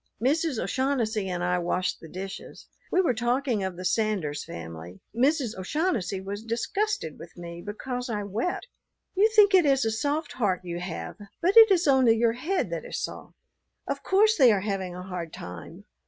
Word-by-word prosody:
Mrs. 285 Hz, +3 st, +1 dB
O'Shaughnessy 230 Hz, -7 st, 0 dB
and 175 Hz, -1 st, -2 dB
I 180 Hz, 0 st, +1 dB
washed 180 Hz, +1 st, -1 dB
the 165 Hz, -, -11 dB
dishes. 195 Hz, +3 st, -8 dB, 0.3 s
We 370 Hz, -, +4 dB
were 330 Hz, -9 st, +2 dB
talking 240 Hz, -1 st, 0 dB
of 190 Hz, -1 st, -3 dB
the 185 Hz, -, -6 dB
Sanders 190 Hz, -8 st, 0 dB
family. 85 Hz, +2 st, -9 dB, 0.2 s
Mrs. 260 Hz, -2 st, +2 dB
O'Shaughnessy 205 Hz, -, -1 dB
was 200 Hz, +3 st, -6 dB
disgusted 235 Hz, -, -2 dB
with 170 Hz, 0 st, -12 dB
me 170 Hz, 0 st, -8 dB
because 245 Hz, +4 st, -5 dB
I 210 Hz, -2 st, -2 dB
wept. 220 Hz, -, -2 dB, 0.5 s
"You 410 Hz, +3 st, +4 dB
think 410 Hz, -2 st, +7 dB
it 370 Hz, -2 st, +7 dB
is 270 Hz, -4 st, +3 dB
a 225 Hz, -, +1 dB
soft 290 Hz, +7 st, -1 dB
heart 200 Hz, -7 st, 0 dB
you 175 Hz, -1 st, -4 dB
have, 180 Hz, -1 st, -6 dB, 0.2 s
but 370 Hz, +3 st, +2 dB
it 450 Hz, -1 st, +10 dB
is 360 Hz, -4 st, +3 dB
only 260 Hz, -5 st, +5 dB
your 230 Hz, 0 st, +3 dB
head 315 Hz, +11 st, -1 dB
that -, -, -3 dB
is -, -, -5 dB
soft. -, -, -6 dB, 0.5 s
Of -, -, -2 dB
course 430 Hz, +3 st, +4 dB
they 260 Hz, -6 st, +7 dB
are 200 Hz, -3 st, +2 dB
having 190 Hz, -3 st, -3 dB
a 180 Hz, -, -7 dB
hard 180 Hz, -3 st, -5 dB
time. 90 Hz, -1 st, -9 dB
225 Hz, 185 wpm, -27 LUFS, 185-285 Hz, 0.5 s, it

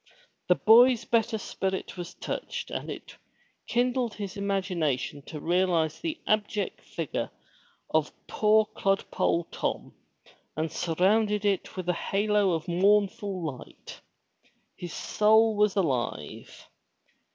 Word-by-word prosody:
The -, -, +5 dB
boy's 235 Hz, +1 st, +6 dB
better 230 Hz, -1 st, +1 dB
spirit 190 Hz, -2 st, -3 dB
was 175 Hz, -1 st, -7 dB
touched, 480 Hz, 0 st, -5 dB
and -, -, -4 dB
it -, -, -8 dB, 0.5 s
kindled 245 Hz, -1 st, 0 dB
his 200 Hz, -1 st, -6 dB
imagination 180 Hz, -9 st, -1 dB
to 155 Hz, -, -6 dB
realize 170 Hz, -2 st, +1 dB
the 330 Hz, -1 st, -4 dB
abject 210 Hz, -2 st, -1 dB
figure 165 Hz, -5 st, -4 dB, 0.6 s
of 155 Hz, -1 st, +1 dB
poor 215 Hz, 0 st, +3 dB
clodpole 195 Hz, -4 st, 0 dB
Tom, -, -, -3 dB, 0.6 s
and 160 Hz, +1 st, -2 dB
surround 190 Hz, +6 st, +2 dB
it 205 Hz, -2 st, -1 dB
with 185 Hz, -1 st, -4 dB
a 180 Hz, -, +2 dB
halo 205 Hz, +1 st, +1 dB
of 165 Hz, +2 st, -3 dB
mournful 195 Hz, +1 st, +1 dB, 0.2 s
light. -, -, -12 dB, 0.7 s
His 175 Hz, -2 st, -7 dB
soul 220 Hz, +4 st, +3 dB
was 210 Hz, -1 st, +2 dB
alive. 135 Hz, -, -3 dB
200 Hz, 115 wpm, -27 LUFS, 175-215 Hz, 0.7 s, boy's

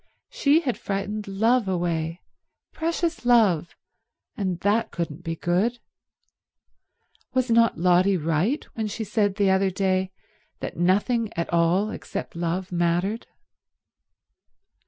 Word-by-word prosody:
She 295 Hz, +3 st, +3 dB
had 255 Hz, -7 st, -2 dB
frightened 205 Hz, +1 st, -3 dB
love 225 Hz, +3 st, +2 dB
away, 170 Hz, -2 st, -2 dB, 0.5 s
precious 330 Hz, 0 st, -2 dB
love, 215 Hz, -9 st, +3 dB, 0.6 s
and 185 Hz, -4 st, -2 dB
that 215 Hz, +3 st, +1 dB
couldn't 170 Hz, -1 st, -5 dB
be 165 Hz, -1 st, -3 dB
good. 185 Hz, +9 st, 0 dB, 1.6 s
Was 255 Hz, -2 st, +1 dB
not 230 Hz, 0 st, +4 dB
Lotty 180 Hz, +2 st, +3 dB
right 165 Hz, -, 0 dB
when 220 Hz, -1 st, -2 dB
she 220 Hz, +2 st, -4 dB
said 205 Hz, -1 st, 0 dB
the 200 Hz, -2 st, +3 dB
other 190 Hz, 0 st, +3 dB
day 190 Hz, 0 st, 0 dB, 0.5 s
that -, -, -5 dB
nothing 205 Hz, +6 st, +1 dB
at 170 Hz, 0 st, -3 dB
all 175 Hz, +5 st, +2 dB
except -, -, -6 dB
love 175 Hz, +2 st, -2 dB
mattered? 175 Hz, +5 st, 0 dB
195 Hz, 115 wpm, -25 LUFS, 175-225 Hz, 1.6 s, not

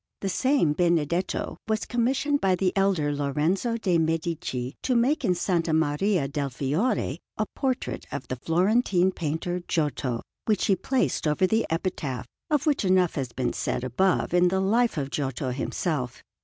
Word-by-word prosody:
The 195 Hz, -, -1 dB
same 255 Hz, -, +2 dB
Benedetto 170 Hz, +1 st, 0 dB
was 220 Hz, -1 st, 0 dB
commissioned 265 Hz, +4 st, +1 dB
by 190 Hz, -1 st, +3 dB
the 185 Hz, 0 st, 0 dB
elder 190 Hz, -7 st, +2 dB
Lorenzo 155 Hz, -, 0 dB
de' 185 Hz, -6 st, +1 dB
Medici 160 Hz, -5 st, -2 dB
to 255 Hz, -, 0 dB
make 260 Hz, +6 st, +2 dB
in 190 Hz, -6 st, +3 dB
S. 175 Hz, -, -4 dB, 0.3 s
Maria 160 Hz, +2 st, +1 dB
del 140 Hz, 0 st, -2 dB
Fiore 145 Hz, -, -1 dB, 0.2 s
a -, -, +1 dB
portrait 265 Hz, -2 st, -2 dB
of 145 Hz, -2 st, -5 dB
the 130 Hz, -, -3 dB
Florentine 185 Hz, -, +2 dB
painter 170 Hz, +2 st, -2 dB
Giotto, 140 Hz, -6 st, -1 dB, 0.2 s
which 210 Hz, -3 st, +1 dB
he 195 Hz, -, +4 dB
placed 220 Hz, -, 0 dB
over 150 Hz, +5 st, +2 dB
the 220 Hz, +4 st, +1 dB
epitaph, 160 Hz, -, -2 dB, 0.2 s
of 300 Hz, -1 st, +1 dB
which 290 Hz, -6 st, +2 dB
enough 185 Hz, -2 st, +3 dB
has 130 Hz, -4 st, -3 dB
been 120 Hz, 0 st, -2 dB
said -, -, -2 dB
above 175 Hz, +10 st, +1 dB
in 180 Hz, 0 st, +5 dB
the 190 Hz, +2 st, +1 dB
Life 225 Hz, +2 st, +2 dB
of 140 Hz, -2 st, -2 dB
Giotto 135 Hz, -1 st, -2 dB
himself. 125 Hz, +1 st, -3 dB
175 Hz, 160 wpm, -26 LUFS, 145-205 Hz, 0.3 s, in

